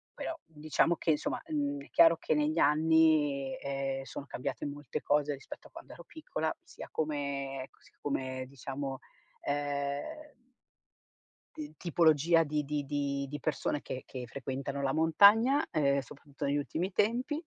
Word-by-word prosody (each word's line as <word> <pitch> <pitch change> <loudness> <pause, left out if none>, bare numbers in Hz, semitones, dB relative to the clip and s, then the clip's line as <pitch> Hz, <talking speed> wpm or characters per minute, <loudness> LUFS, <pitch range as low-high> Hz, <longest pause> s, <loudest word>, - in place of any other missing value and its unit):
però 330 - -4
diciamo 155 +2 +1
che, 160 - +1
insomma, 150 - -1
n 285 -1 0
è - - -16
chiaro 165 0 +7
che - - 0
negli 150 +1 +1
anni, 150 -3 +4
ehm, 135 -1 -2
sono 140 - -7
cambiate 135 -1 -4
molte 145 -2 -5
cose 145 0 +2
rispetto 135 - -10
a - - -25
quando - - -11
ero - - -12
piccola, 160 - -3
sia - - -10
come 140 -3 -2
ec - - -25
s - - -22
come, 130 -2 -2
diciamo, 135 0 -5 0.4
ehm 145 - -3 1.2
d 150 0 -7
tipologia 165 -1 +4
di 150 0 -1
di 145 0 -2
di 140 -1 -1
di 145 +2 -5
persone 150 -1 -1
che 130 - -6
che 125 -2 -6
frequentano 140 +1 -4
la 135 -1 +1
montagna, 205 - +6
ehm, 140 -2 +3
soprattutto 140 +1 -7
negli 140 +1 +1
ultimi 160 +6 -2
tempi. 250 - 0
145 Hz, 150 wpm, -31 LUFS, 140-160 Hz, 1.2 s, chiaro